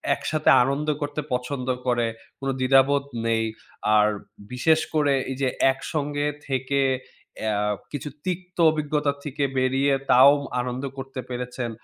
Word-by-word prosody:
একসাথে 155 Hz, 0 st, 0 dB
আনন্দ 140 Hz, +4 st, -1 dB
করতে 145 Hz, +1 st, -2 dB
পছন্দ 125 Hz, +1 st, -3 dB, 0.2 s
করে, 120 Hz, -1 st, +2 dB, 0.3 s
কোন 135 Hz, -, -5 dB
দ্বিধাবোধ 135 Hz, +2 st, +4 dB, 0.2 s
নেই। 115 Hz, 0 st, +1 dB, 0.5 s
আর 105 Hz, 0 st, +5 dB, 0.4 s
বিশেষ 155 Hz, +6 st, +3 dB, 0.2 s
করে 145 Hz, -2 st, +3 dB, 0.2 s
এই -, -, -3 dB
যে 135 Hz, -, +2 dB, 0.2 s
একসঙ্গে 145 Hz, +1 st, -3 dB, 0.2 s
থেকে 135 Hz, +1 st, 0 dB, 1.1 s
কিছু 145 Hz, 0 st, -5 dB
অ্যা 150 Hz, -, -38 dB
তিক্ত 180 Hz, 0 st, -4 dB
অভিজ্ঞতা 150 Hz, -1 st, 0 dB
থেকে 145 Hz, -1 st, -3 dB
বেরিয়ে, 135 Hz, +2 st, +2 dB, 0.2 s
তাও 135 Hz, +3 st, +8 dB, 0.3 s
আনন্দ 125 Hz, +2 st, -4 dB
করতে 135 Hz, 0 st, -6 dB
পেরেছেন। 125 Hz, -1 st, -4 dB
140 Hz, 125 wpm, -24 LUFS, 130-145 Hz, 1.1 s, তাও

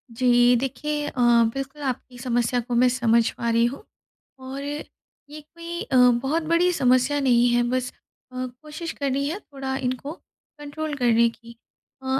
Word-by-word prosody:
जी, 245 Hz, 0 st, +4 dB
देखिए 295 Hz, +4 st, -2 dB
अ, 250 Hz, -, -3 dB, 0.3 s
बिल्कुल 275 Hz, +2 st, -6 dB
आपकी 255 Hz, -1 st, -4 dB
समस्या 245 Hz, -1 st, 0 dB
को 240 Hz, 0 st, -4 dB
मैं 250 Hz, +1 st, +5 dB
समझ 235 Hz, -2 st, +2 dB
पा 235 Hz, -, -3 dB
रही 230 Hz, +1 st, +3 dB
हूँ। 270 Hz, -, -4 dB, 0.6 s
और 265 Hz, +2 st, -7 dB
ये 295 Hz, 0 st, -10 dB
कोई 335 Hz, +2 st, -8 dB
अ, 260 Hz, -, -3 dB
बहुत 250 Hz, +6 st, +3 dB
बड़ी 335 Hz, +3 st, +2 dB
समस्या 255 Hz, +1 st, +2 dB
नहीं 245 Hz, -3 st, +3 dB
है 240 Hz, 0 st, +3 dB
बस 255 Hz, 0 st, -1 dB, 0.4 s
अ, 255 Hz, 0 st, -4 dB, 0.2 s
कोशिश 310 Hz, +2 st, -6 dB
करनी 280 Hz, 0 st, -2 dB
है 380 Hz, +6 st, -4 dB
थोड़ा 270 Hz, -6 st, -6 dB
इनको 255 Hz, +2 st, -3 dB, 0.5 s
कंट्रोल 295 Hz, +1 st, -5 dB
करने 235 Hz, -2 st, +3 dB
की 235 Hz, 0 st, -15 dB, 0.5 s
अ, -, -, -11 dB
260 Hz, 155 wpm, -24 LUFS, 245-295 Hz, 0.6 s, मैं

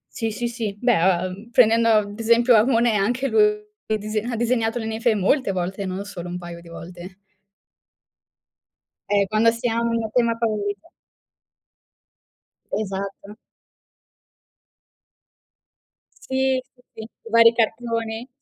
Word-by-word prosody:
Sì, 225 Hz, -3 st, -2 dB
sì, 240 Hz, +3 st, -3 dB
sì. 225 Hz, -4 st, -4 dB
Beh, 240 Hz, -8 st, +2 dB
uhm, 185 Hz, +4 st, -1 dB
prendendo 230 Hz, -1 st, +4 dB
ad 210 Hz, -2 st, +1 dB
esempio 235 Hz, +1 st, +4 dB
a 215 Hz, -, +5 dB
Monet, 235 Hz, -3 st, +2 dB
anche 245 Hz, +7 st, 0 dB
lu 445 Hz, -, 0 dB, 0.5 s
è 220 Hz, -, 0 dB
dise 215 Hz, +1 st, -3 dB
ha 240 Hz, +2 st, -4 dB
disegnato 230 Hz, 0 st, 0 dB
le 220 Hz, -, -5 dB
ninfee 225 Hz, +1 st, 0 dB
molte 205 Hz, +3 st, +1 dB
volte, 190 Hz, +2 st, -3 dB
non 185 Hz, +2 st, -4 dB
solo 180 Hz, -4 st, -8 dB
un 175 Hz, -, -5 dB
paio 175 Hz, -1 st, -8 dB
di 170 Hz, -, -15 dB
volte. 175 Hz, +2 st, -10 dB, 1.9 s
Eh, 200 Hz, -1 st, +2 dB
quando 215 Hz, +3 st, +3 dB
si 230 Hz, +1 st, -2 dB
ha 230 Hz, 0 st, 0 dB
un 230 Hz, -1 st, -1 dB
tema 235 Hz, -1 st, +2 dB
favorito 210 Hz, -3 st, -3 dB, 1.8 s
Esatto. 200 Hz, 0 st, -5 dB, 2.9 s
Sì, 265 Hz, 0 st, 0 dB, 0.3 s
sì, -, -, -10 dB
i 230 Hz, +1 st, -13 dB
vari 230 Hz, 0 st, +6 dB
cartoni. 230 Hz, 0 st, -2 dB
220 Hz, 125 wpm, -22 LUFS, 200-235 Hz, 2.9 s, vari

